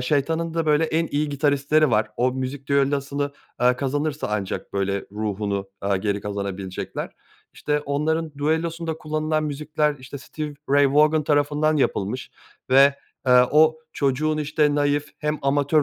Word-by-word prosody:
şeytanın 160 +5 0
da 165 -1 0
böyle 150 +1 +3
en 160 +1 0
iyi 150 +1 0
gitaristleri 145 +1 +2
var. 110 -1 +2
O 125 +1 +2
müzik 130 +1 -5
düellosunu, 140 0 0 0.3
aaa, 125 +1 +3
kazanırsa 145 +3 -2
ancak 100 -3 -3
böyle 100 0 0
ruhunu, 100 -2 -2
aaa, 100 0 +1
geri 100 +1 -1
kazanabilecekler. 100 -2 -5 0.4
İşte, 150 0 -1
onların 155 +2 -1
düellosunda 160 +2 -1
kullanılan 155 0 -1
müzikler, 150 0 -1
işte, 130 +2 -9
Stevie 150 +1 -6 0.2
Ray 140 -1 +4
Vaughan 150 0 +4
tarafından 150 +1 +2
yapılmış 125 -3 -1 0.4
ve, 140 +2 +6 0.3
eee, 125 -1 +7
o 155 +1 +5
çocuğun, 150 +3 0
işte, 150 0 +1
naif, 145 0 +1
hem 150 0 -1
amatör 145 +2 +2
145 Hz, 140 wpm, -23 LUFS, 130-155 Hz, 0.4 s, eee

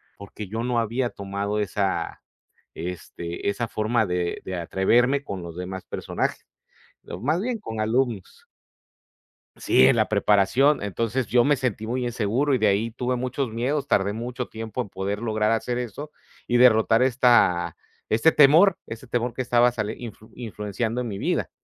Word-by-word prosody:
porque 100 +1 -9
yo 110 +4 -4
no 125 0 -1
había 120 +2 -1
tomado 100 +1 -4
esa 95 -3 -2 0.5
este, 85 0 -6
esa 115 +3 -2
forma 110 +1 0
de 90 -1 -2
de 95 -1 -4
atreverme 120 +10 +2
con 100 -10 -6
los 85 0 -9
demás 95 +1 -6
personajes, - - -4 0.5
¿no? 90 - -8
Más 155 - 0
bien 240 0 -2
con 110 - -7
alumnos. 115 -3 -2 1.1
Sí, 65 - +4
en - - +4
la - - +2
preparación. 115 +8 +3
Entonces, 115 +5 -2
yo 120 0 +4
me 145 +1 +3
sentí 115 -4 -2
muy 125 +2 -2
inseguro 120 +4 0
y - - +2
de - - +3
ahí 105 +4 +1
tuve 125 +1 -2
muchos 125 +1 -2
miedos, 135 +5 -1
Tardé 100 -5 +2
mucho 120 +2 -5
tiempo 110 +1 -6
en 110 - -10
poder 100 +2 -4
lograr 110 -2 0
hacer 120 +2 -1
eso 125 +5 -6 0.4
y 120 - +1
derrotar 115 -2 +5
esta 120 -8 +3 0.3
este 115 +9 +4
temor, 155 +7 +6
ese 115 +3 -9
temor 120 0 -2
que 130 - -2
estaba 120 -1 +3
sali 110 -2 -3
influ 110 -2 -10
influenciando 110 0 -4
en 120 - -5
mi 100 -2 -5
vida. - - -1
115 Hz, 165 wpm, -24 LUFS, 100-125 Hz, 1.1 s, temor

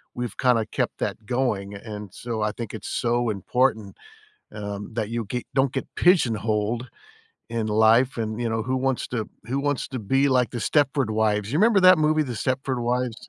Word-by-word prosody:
we've 120 -3 -4
kinda 125 -4 +3
kept - - -2
that 110 - -3
going, 110 -5 -1
and 105 -1 -8
so, 115 -2 -4
I 105 0 +1
think 115 -1 -6
it's 110 - -6
so 120 0 0
important, 110 +1 0 0.6
um, 100 0 -6
that 110 -3 -2
you 115 -1 -2
get 125 +4 -4
don't 135 -1 +2
get 135 - -3
pigeonholed 115 - +2 0.6
in 115 -2 -1
life, 110 +4 +4
and, 110 0 -3
you 120 - 0
know, 110 0 -1
who 130 +3 -1
wants 130 -1 0
to 115 -4 -3 0.2
who 130 +4 -2
wants 145 -1 -1
to 130 - -5
be 135 +7 +2
like 125 -2 +2
The 120 - -4
Stepford 140 -2 +1
Wives? 105 -1 +1
You 150 - +1
remember 215 -1 +5
that 185 -2 +7
movie, 155 0 +3
The 125 -4 -5
Stepford 130 +2 -1
Wives? 120 -1 -2
120 Hz, 190 wpm, -24 LUFS, 110-130 Hz, 0.6 s, that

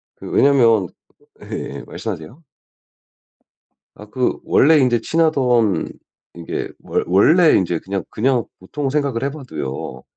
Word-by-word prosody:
그 - - -10
왜냐하면 115 -8 +4 0.6
예예 - - -6
말씀하세요. 120 - -7 1.5
아 105 - -13
그 125 +4 -1
원래 160 +3 +4
인제 125 -3 +2
친하던 130 - +1 0.5
이게 85 -1 -5
원 - - -2
원래 155 - +5
인제 90 -3 0
그냥 95 0 -4
그냥 125 +1 0 0.2
보통 135 +9 -4
생각을 140 -4 -1
해봐도요. 125 - -6
125 Hz, 240 characters per minute, -19 LUFS, 100-140 Hz, 1.5 s, 원래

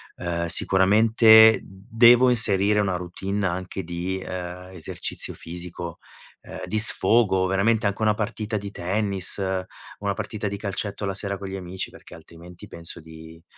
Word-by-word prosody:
ehm, 85 -1 -4
sicuramente 110 +5 +5
devo 115 +6 +3
inserire 105 -3 +4
una 95 -3 -1
routine 95 +3 -5
anche 95 +1 -5
di 90 +2 -5
ehm, 90 0 -8
esercizio 85 -4 -3
fisico, 85 0 -9 0.4
ehm, - - -11
di 110 - -2
sfogo, 105 -3 +4
veramente 100 +4 0
anche 100 +1 -2
una 105 -1 +1
partita 110 +1 -4
di 100 0 -8
tennis, 100 +1 +2 0.6
una 100 -1 -3
partita 105 +1 -6
di 100 0 -5
calcetto 100 0 -4
la 100 - -3
sera 100 0 -2
con 100 - -9
gli 95 - -7
amici, 90 0 -6
perché - - -15
altrimenti 85 +2 -15
penso 85 0 -3
di 80 +1 -15
95 Hz, 145 wpm, -22 LUFS, 90-105 Hz, 0.6 s, sicuramente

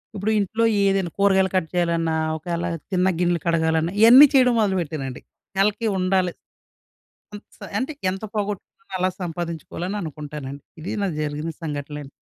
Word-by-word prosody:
ఇప్పుడు 205 +2 -1
ఇంట్లో 220 +4 0 0.2
ఏదైనా 195 -3 +1
కూరగాయలు 190 -1 +4
కట్ 185 -3 +1
చేయాలన్నా, 170 -2 +1 0.2
ఒకవేళ 170 +1 -3 0.3
తిన్న 185 0 +2
గిన్నెలు 175 -1 +2
కడగాలన్న 160 0 +2
ఇయన్నీ 250 +6 +10
చేయడం 250 -2 +5
మొదలుపెట్టానండి. 160 -10 -2 0.4
నెలకి 210 +3 +2
ఉండాలి. 185 -1 +1 1.0
అంత 205 - -10
సా 205 - -9
అంటే 265 +6 -2 0.2
ఎంత 195 +3 -5
పోగొట్టుకున్నా 205 0 -5
అలా 185 +1 +2
సంపాదించుకోవాలని 175 +3 -4
అనుకుంటానండి. 145 -3 -7 0.2
ఇది 160 - -5
నాకు 180 -6 -1
జరిగిన 150 +2 -3
సంఘటనలండీ. 145 -1 -5
175 Hz, 130 wpm, -23 LUFS, 160-195 Hz, 1.0 s, ఇయన్నీ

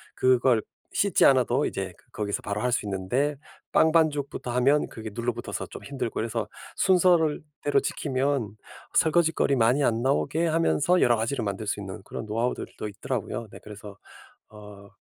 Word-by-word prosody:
그걸 125 -3 +3 0.3
씻지 200 -4 +2
않아도 130 -3 +4
이제 - - -4 0.2
거기서 100 -1 -2
바로 100 +1 -3
할 125 - 0
수 110 - 0
있는데 120 +10 -1 0.4
빵 160 - +4
반죽부터 150 -6 +1
하면 135 +4 +3
그게 110 -1 -8
눌러붙어서 120 +1 -3
좀 - - -10
힘들고 135 -5 -4
이래서 115 -1 -2 0.3
순서를 175 -5 +3 0.2
대로 145 -1 +3
지키면 130 -6 -1 0.4
설거짓거리 160 -3 +3
많이 125 +5 +3
안 115 -3 +1
나오게 155 +5 +1
하면서 165 +2 +2
여러 120 - +5
가지를 115 +2 -2
만들 100 +1 -4
수 105 - -1
있는 95 -1 -7
그런 - - -6
노하우들도 115 0 -3
있더라고요. 115 +2 -4
네 - - -11
그래서 105 -1 -10 0.5
어 105 -1 -13
125 Hz, 355 characters per minute, -26 LUFS, 110-145 Hz, 0.5 s, 여러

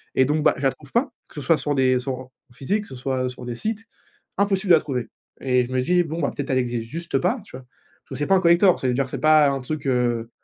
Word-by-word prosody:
Et 130 - +4
donc 150 +3 0
bah, - - +4
je - - -8
la 135 -1 +2
trouve 140 0 -16
pas, 255 +4 +1 0.2
que - - -20
ce 150 - -5
soit 165 +3 +3
sur 145 +1 -2
des 130 -1 +3
sur 130 +1 -3
en 130 0 -9 0.2
en - - -19
physique, 200 - -2
que - - -14
ce 130 - -9
soit 130 0 -2
sur 125 - -10
des 120 - -4
sites, 220 - -4 0.5
impossible 200 -1 0
de - - +10
la 160 - +2
trouver 125 -5 -4 0.3
et 125 -1 +2
je 125 - -10
me 130 - +1
dis: 175 +6 +2
«Bon 165 +1 -5
bah, 140 - +1
peut-être 140 -1 -4
elle 130 - +2
existe 120 -2 -3
juste 165 -1 -3
pas», 185 - 0
tu 160 - -11
vois? 130 - -14 0.4
Parce - - -36
que - - -6
c'est 145 - -2
pas 195 - +4
un 185 - +3
collector. 175 +1 +4
Ça 130 - -1
veut 125 - +1
dire 135 +1 0
c'est - - -5
pas 155 -1 +6
un 135 -1 -2
truc, 140 +2 -5
heu 120 -2 0
140 Hz, 305 wpm, -23 LUFS, 130-170 Hz, 0.5 s, de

